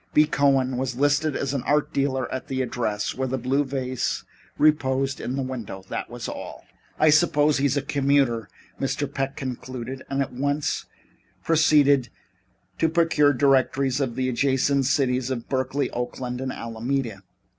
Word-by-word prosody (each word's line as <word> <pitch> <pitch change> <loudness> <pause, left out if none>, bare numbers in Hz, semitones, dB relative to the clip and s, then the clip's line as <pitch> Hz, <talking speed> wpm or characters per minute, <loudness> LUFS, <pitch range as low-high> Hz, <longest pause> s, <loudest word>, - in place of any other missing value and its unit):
B. 150 - +7
Cohen 135 -3 +2
was 130 -1 -2
listed 145 +2 +2
as 140 -1 -2
an 140 - -1
art 150 +3 +1
dealer 130 -2 0
at 130 - -4
the 130 -1 -1
address 115 -4 -2
where 130 0 -2
the 130 +1 -1
blue 130 +3 +1
vase 130 -2 -2 0.3
reposed 135 -2 +2
in 125 - -3
the 135 - -1
show - - -4
window. 115 -7 -6
That - - -4
was - - -6
all. - - -7 0.3
"I 155 0 +6
suppose 150 -2 +3
he's 140 0 +2
a 140 - 0
commuter," 140 -6 +1 0.3
Mr. 140 +1 -1
Peck 135 0 -3
concluded, 130 0 -5
and 140 0 +1
at 135 - -9
once 145 +3 -1 0.6
proceeded 145 -5 +4 0.7
to 160 - +3
procure 160 -3 +3
directories 135 -1 +2
of 130 -4 -1
the 130 0 0
adjacent 135 +2 +1
cities 130 -3 +1
of 120 -3 -4
Berkeley, 130 +1 -1
Oakland 125 +1 -4
and 130 0 -2
Alameda. 115 -2 -3
135 Hz, 160 wpm, -24 LUFS, 130-145 Hz, 0.7 s, B